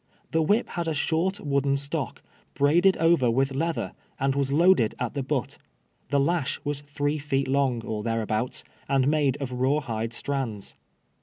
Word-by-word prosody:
The 160 Hz, -, +2 dB
whip 205 Hz, +9 st, +2 dB
had 170 Hz, -2 st, -3 dB
a 160 Hz, -, 0 dB
short 175 Hz, +7 st, 0 dB
wooden 140 Hz, -1 st, +1 dB
stock, 140 Hz, +1 st, -4 dB, 0.3 s
braided 175 Hz, +7 st, +4 dB
over 165 Hz, -6 st, +4 dB
with 135 Hz, +3 st, +1 dB
leather, 165 Hz, +4 st, -1 dB, 0.3 s
and 135 Hz, 0 st, +2 dB
was 140 Hz, -1 st, 0 dB
loa<led 165 Hz, -, +4 dB
at 125 Hz, -, -3 dB
the 140 Hz, -, -2 dB
butt. 135 Hz, -2 st, -2 dB, 0.5 s
Tlie 140 Hz, -1 st, +3 dB
lash 170 Hz, -4 st, 0 dB
was 145 Hz, -1 st, -2 dB
three 145 Hz, +1 st, -2 dB
feet 140 Hz, -2 st, -1 dB
long, 130 Hz, -4 st, +1 dB
or 110 Hz, -2 st, -3 dB
thereabouts, 115 Hz, +1 st, -1 dB, 0.3 s
and 135 Hz, -2 st, +3 dB
made 145 Hz, -3 st, +2 dB
of 135 Hz, -3 st, -4 dB
raw 130 Hz, +4 st, +1 dB
hide 115 Hz, -4 st, -3 dB
strands. 115 Hz, -, -3 dB
140 Hz, 165 wpm, -26 LUFS, 130-155 Hz, 0.5 s, braided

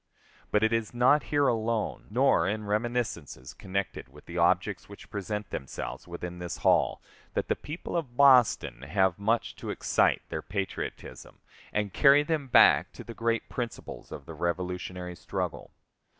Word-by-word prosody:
But 105 Hz, -, +2 dB
it 110 Hz, +1 st, +3 dB
is 115 Hz, 0 st, -1 dB
not 130 Hz, +5 st, +4 dB
here 145 Hz, -1 st, +3 dB
alone, 115 Hz, -1 st, -1 dB
nor 120 Hz, -6 st, +3 dB
in 105 Hz, +2 st, -2 dB
reminiscences 105 Hz, -, -2 dB
connected 100 Hz, -, -4 dB
with 75 Hz, +3 st, -16 dB
the 85 Hz, -, -9 dB
objects 90 Hz, +4 st, +1 dB
which 100 Hz, -, -13 dB
present 105 Hz, 0 st, -4 dB
themselves 70 Hz, -, -6 dB
within 90 Hz, 0 st, -6 dB
this 90 Hz, -1 st, -5 dB
hall, -, -, +3 dB, 0.3 s
that -, -, -1 dB
the -, -, +2 dB
people 155 Hz, +4 st, -7 dB
of 135 Hz, -8 st, -3 dB
Boston 130 Hz, -, +5 dB
have 95 Hz, +5 st, +1 dB
much 110 Hz, +3 st, 0 dB
to -, -, -7 dB
excite -, -, +1 dB
their -, -, -3 dB
patriotism 95 Hz, 0 st, -5 dB, 0.3 s
and 105 Hz, -2 st, -1 dB
carry 140 Hz, +1 st, +6 dB
them 150 Hz, -2 st, -1 dB
back 125 Hz, -, +6 dB
to -, -, -9 dB
the 115 Hz, -, -8 dB
great 115 Hz, 0 st, -1 dB
principles 120 Hz, -2 st, -6 dB
of -, -, -8 dB
the -, -, -8 dB
Revolutionary 90 Hz, 0 st, -3 dB
struggle. 75 Hz, -, -4 dB
105 Hz, 155 wpm, -28 LUFS, 90-120 Hz, 0.3 s, carry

